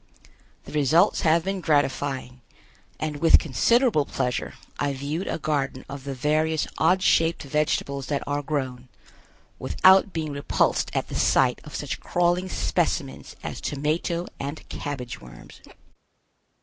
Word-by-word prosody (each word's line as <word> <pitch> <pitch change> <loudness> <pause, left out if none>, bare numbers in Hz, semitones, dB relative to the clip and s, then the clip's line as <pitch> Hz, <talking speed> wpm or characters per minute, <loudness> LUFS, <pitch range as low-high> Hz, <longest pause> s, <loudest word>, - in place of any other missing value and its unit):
The - - -12
results 155 +6 +3
have 160 +1 +3
been 195 0 -2
gratifying, 140 -4 0 0.6
and 155 -1 -3
with 165 +3 +6
considerable 210 - +2
pleasure 125 -1 -2 0.2
I 140 - 0
viewed 145 +7 -4
a - - -1
garden 140 -4 -2
of 140 -1 -8
the 140 -1 -4
various 155 +4 +1
odd 180 +4 +3
shaped 165 -3 +3
vegetables 140 -1 -1
that 145 -2 -1
are 145 0 -1
grown, 130 -4 -4 0.7
without 190 +2 +5
being 160 -3 -3
repulsed 140 0 +1
at - - -1
the - - -8
sight - - +3
of - - -10
such - - -4
crawling 175 +1 0
specimens 165 -7 -2
as - - -5
tomato 155 +4 -1
and 140 +3 -6
cabbage 125 -5 -5
worms. - - -14
150 Hz, 135 wpm, -25 LUFS, 140-165 Hz, 0.7 s, with